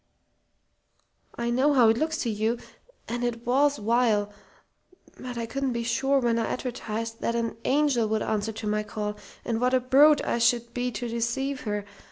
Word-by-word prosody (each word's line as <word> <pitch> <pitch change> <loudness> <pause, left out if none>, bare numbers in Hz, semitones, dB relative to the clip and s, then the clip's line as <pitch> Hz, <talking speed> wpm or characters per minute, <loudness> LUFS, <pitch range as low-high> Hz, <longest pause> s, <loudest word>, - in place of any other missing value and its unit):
"I 235 0 -2
know 270 +5 +3
how 240 -4 +6
it 225 - +3
looks 315 +1 0
to 240 - -1
you. 220 +3 0 0.5
And 240 +1 -3
it 235 -1 -3
was 280 +4 +3
vile. 210 -2 +1 0.9
But 250 -1 -6
I 230 - -2
couldn't 265 +2 -2
be 235 0 -2
sure 270 +4 +1
when 235 -3 +1
I 225 - -1
advertised 230 -3 -4
what 235 - -1
an 230 -1 -1
angel 275 -5 +2
would 215 0 0
answer 215 +1 -1
to 220 0 -7
my 210 0 0
call, 210 0 -4 0.3
and 230 -1 -1
what 250 +1 +3
a - - +4
brute 280 +4 +5
I 235 - 0
should 235 0 +2
be 250 0 -1
to 240 - -4
deceive 235 +4 -2
her. 205 -1 -2
235 Hz, 185 wpm, -26 LUFS, 225-255 Hz, 0.9 s, how